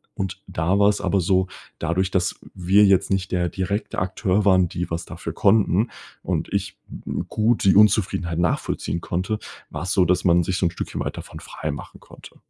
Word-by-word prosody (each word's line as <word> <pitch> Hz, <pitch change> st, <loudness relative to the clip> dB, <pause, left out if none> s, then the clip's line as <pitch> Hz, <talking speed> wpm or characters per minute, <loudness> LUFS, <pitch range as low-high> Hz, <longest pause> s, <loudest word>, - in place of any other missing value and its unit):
und 95 Hz, -2 st, -4 dB
da 85 Hz, +5 st, 0 dB
war's 100 Hz, 0 st, +3 dB
aber 100 Hz, -, +1 dB
so, 95 Hz, +1 st, +2 dB, 0.3 s
dadurch, 90 Hz, +3 st, 0 dB
dass 90 Hz, -2 st, 0 dB, 0.2 s
wir 95 Hz, +3 st, +4 dB
jetzt 95 Hz, -2 st, +3 dB
nicht 95 Hz, -1 st, -1 dB
der 90 Hz, -1 st, +1 dB
direkte 100 Hz, +3 st, -3 dB
Akteur 95 Hz, +2 st, 0 dB
waren, 95 Hz, -3 st, +4 dB
die 90 Hz, -, -4 dB
was 85 Hz, 0 st, -2 dB
dafür -, -, -7 dB
konnten 105 Hz, +1 st, +3 dB, 0.3 s
und -, -, -2 dB
ich -, -, -2 dB, 0.5 s
gut 110 Hz, +2 st, +1 dB
die 95 Hz, -, +5 dB
Unzufriedenheit 95 Hz, -5 st, +3 dB
nachvollziehen 85 Hz, 0 st, -1 dB
konnte, 95 Hz, +6 st, -2 dB, 0.3 s
war's 90 Hz, -, -4 dB
so, 95 Hz, -3 st, +3 dB
dass 90 Hz, +1 st, +1 dB
man 85 Hz, -1 st, +4 dB
sich 90 Hz, +2 st, -2 dB
so 90 Hz, -, +2 dB
'n 85 Hz, -, -3 dB
Stückchen -, -, -5 dB
weit -, -, -4 dB
davon -, -, -9 dB
freimachen 70 Hz, -2 st, -6 dB
konnte. -, -, -15 dB
95 Hz, 180 wpm, -23 LUFS, 90-100 Hz, 0.5 s, die